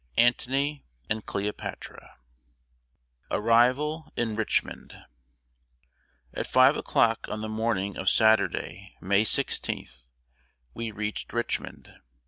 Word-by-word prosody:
ANTONY 135 +4 +2 0.3
AND 110 0 -2
CLEOPATRA. 100 +1 -4
[Sidenote: - - -16 1.3
ARRIVAL 140 +7 +3
IN 115 -2 0
RICHMOND.] 110 -1 -2 1.4
At - - -3
5 - - +5
o'clock 115 -1 +1
on 105 - -4
the 110 - -3
morning 110 -3 -1
of 95 - +2
Saturday, 110 0 +1
May 100 +3 +2
16th, 65 - -1 0.7
we 115 - -4
reached 105 0 -5
Richmond. 120 0 -3
110 Hz, 100 wpm, -27 LUFS, 105-120 Hz, 1.4 s, 5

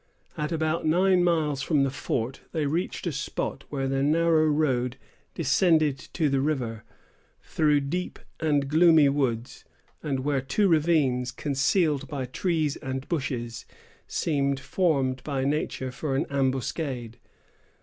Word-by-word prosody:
At 150 +1 -3
about 160 0 0
nine 180 +3 +3
miles 155 -5 +1
from 145 0 +2
the 135 - 0
fort, 125 -1 -3
they 155 -2 0
reached 165 +7 -2
a 170 - 0
spot 140 -1 -4
where 135 -2 -2
the 135 0 0
narrow 160 +2 +3
road 130 -5 +1 0.4
descended 155 -1 +2
to 160 -3 +1
the 135 -1 +1
river 125 -7 -2 0.6
through 150 -2 +2
deep 175 +6 -3 0.2
and 145 -3 +1
gloomy 160 -1 +5
woods, 125 -4 -2 0.4
and 135 -3 -2
where 140 0 0
two 165 +11 +1
ravines, 150 -7 +2
concealed 145 +1 0
by 135 -2 -4
trees 155 +2 -1
and 130 0 -5
bushes, 125 -7 -3 0.4
seemed 140 -3 0
formed 135 -4 0
by 140 -3 -2
nature 140 -2 -2
for 135 +1 -3
an 135 - +1
ambuscade. 130 -3 -2
145 Hz, 135 wpm, -26 LUFS, 130-160 Hz, 0.6 s, gloomy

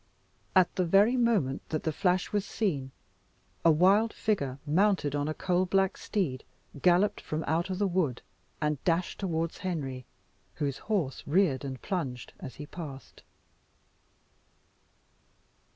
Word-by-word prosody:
At 185 -2 +5
the 185 - +3
very 200 +8 +4
moment 215 - +2
that 155 - -2
the 160 - 0
flash 180 +3 +1
was 205 -1 +1
seen, 175 -10 -2 0.7
a 170 - +6
wild 195 +8 +4
figure, 140 -12 -1
mounted 180 -1 +2
on 145 0 0
a 155 - -1
coal 185 0 +1
black 195 +1 +2
steed, 160 - -2 0.4
galloped 185 +4 +3
from 155 +1 -3
out 165 +3 0
the 190 +2 0
wood, 175 -9 0 0.4
and 150 -2 -1
dashed 170 0 0
towards 165 -4 -2
Henry, 135 -9 -4 0.5
whose 140 -3 -2
horse 175 -11 0
reared 150 -4 +2
and 135 -2 -6
plunged 135 -10 -3
as 130 - -8
he 150 - -7
passed. 145 -4 -9
170 Hz, 135 wpm, -29 LUFS, 145-195 Hz, 0.7 s, a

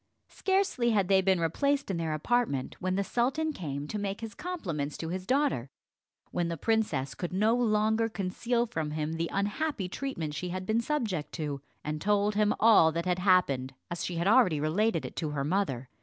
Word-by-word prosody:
Scarcely 380 -11 +1
had 200 -5 +2
they 190 -1 +5
been 190 -1 +2
replaced 275 - 0
in 185 - -2
their 160 -2 -1
apartment, 155 - 0
when 185 0 -1
the 200 - +1
sultan 270 +9 0
came 145 - -5
to 210 - -3
make 200 0 -3
his 225 -2 -6
compliments 170 - -4
to 165 - -4
his 185 +1 -4
daughter, 255 - +1 0.6
when 175 -1 0
the 170 0 -3
princess 160 - 0
could 175 +6 -5
no 210 +5 +3
longer 220 -1 +2
conceal 230 +4 -1
from 160 -10 -3
him 155 +1 -2
the 165 +1 -2
unhappy 205 +2 -1
treatment 180 - -4
she 165 +5 -4
had 185 +1 -4
been 220 +4 +1
subject 225 - -2
to, 145 -4 -3 0.2
and 150 0 -3
told 205 +2 +2
him 210 0 +3
all 210 -8 +6
that 170 +2 -2
had 180 0 0
happened 140 -9 +2 0.2
as 170 - -3
she 175 - -3
had 170 +1 -1
already 205 - +5
related 195 +10 +1
it - - -7
to 155 - -1
her 145 -2 -2
mother. 145 -7 -1
190 Hz, 195 wpm, -29 LUFS, 160-225 Hz, 0.6 s, all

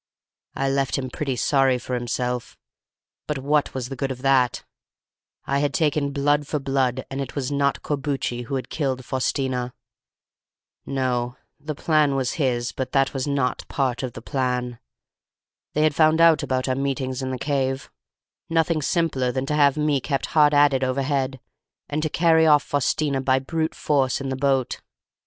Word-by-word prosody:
"I 135 - 0
left 135 -1 0
him 130 -2 -4
pretty 135 -2 -2
sorry 135 0 +3
for 125 +1 -6
himself; 125 0 -2 0.7
but 150 - -1
what 145 +2 0
was 130 -1 -3
the 135 - -5
good 135 +1 -2
of 130 0 -6
that? 130 -2 +2 0.8
I 140 0 0
had 145 -2 0
taken 150 -2 +1
blood 145 +1 +1
for 150 - -1
blood, 135 -2 0
and 135 +1 -3
it 135 - -6
was 140 -1 -2
not 140 -1 0
Corbucci 135 -4 -2
who 135 - -3
had 130 -2 -4
killed 130 -4 -2
Faustina. 130 -1 -1 1.1
No, 125 -2 -1 0.2
the 150 0 -5
plan 150 -2 +2
was 130 -2 0
his, 120 -2 0
but 130 - -5
that 135 -1 +2
was 135 0 -2
not 140 -3 0
part 130 -3 -1
of 125 -3 -4
the 115 - -9
plan. 125 -3 -2 0.9
They 150 - +2
had 155 -1 +3
found 155 +1 +4
out 165 -1 +6
about 130 0 -1
our 130 - +1
meetings 135 -1 -2
in 130 - -3
the 130 - -3
cave: 135 -1 -2 0.6
nothing 165 -1 +1
simpler 140 -5 0
than 130 +1 -2
to 150 - -2
have 145 -1 +4
me 150 -2 +2
kept 135 0 -1
hard 150 -2 +5
at 145 -1 +5
it 130 0 0
overhead 135 0 -1 0.5
and 150 +1 -2
to 155 - -1
carry 160 0 +4
off 150 -2 +5
Faustina 140 0 0
by 130 0 +3
brute 160 +4 -2
force 135 -4 +1
in 135 -1 -4
the 130 - -1
boat. 135 -1 0
135 Hz, 175 wpm, -23 LUFS, 130-145 Hz, 1.1 s, out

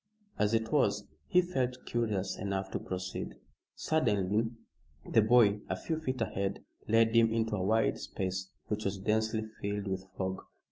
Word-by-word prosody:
As 105 +2 +3
it 110 0 0
was, 105 -8 +2 0.2
he 180 -2 +5
felt 130 -8 -2
curious 110 -5 -1
enough 95 0 -3
to - - -2
proceed. 95 0 -4 0.4
Suddenly 105 -7 +1 0.6
the 110 - +5
boy 110 -2 +5
a - - 0
few 160 -1 -3
feet 130 -5 -3
ahead 100 -3 -2 0.2
led 115 +1 +4
him 115 -1 +6
into 110 -1 +1
a 95 - -2
wide 110 +3 +2
space 95 0 -3 0.2
which 105 0 -2
was 100 0 0
densely 110 +2 +1 0.2
filled 100 0 -2
with 95 0 -3
fog. 95 0 -2
105 Hz, 155 wpm, -32 LUFS, 100-115 Hz, 0.6 s, him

